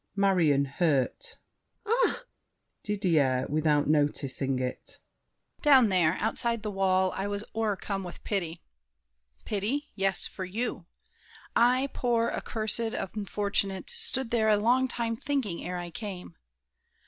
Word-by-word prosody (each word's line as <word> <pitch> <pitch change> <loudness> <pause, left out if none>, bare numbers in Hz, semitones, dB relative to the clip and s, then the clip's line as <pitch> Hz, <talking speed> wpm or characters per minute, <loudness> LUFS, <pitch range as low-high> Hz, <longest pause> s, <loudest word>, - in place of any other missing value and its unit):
MARION 175 -8 +3
(hurt). 140 -2 -1 0.5
Ah! 480 +3 +1 0.6
DIDIER 160 -11 +1
(without 150 -1 +2
noticing 145 -3 0
it). 125 0 -5 0.6
Down 265 -6 +6
there, 180 -4 +3
outside 230 0 0
the 210 - -3
wall, 190 -1 +2
I 195 - -2
was 205 0 -3
o'ercome 205 -3 -2
with 175 -1 -9
pity. 175 -5 -3 0.8
Pity? 235 +9 -2
yes, 195 -1 0
For 190 - -6
you! 195 -1 -4 0.7
I, 255 +3 +4
poor, 235 -2 +1
accursed, 220 -1 -2 0.4
unfortunate, 200 - 0
Stood 455 - +1
there 220 -2 +2
a 210 - +5
long 245 +5 +3
time 235 -2 -2
thinking, 240 -8 -2
ere 180 0 -4
I 175 -1 -6
came! 185 -3 -7
200 Hz, 120 wpm, -28 LUFS, 170-230 Hz, 0.8 s, Down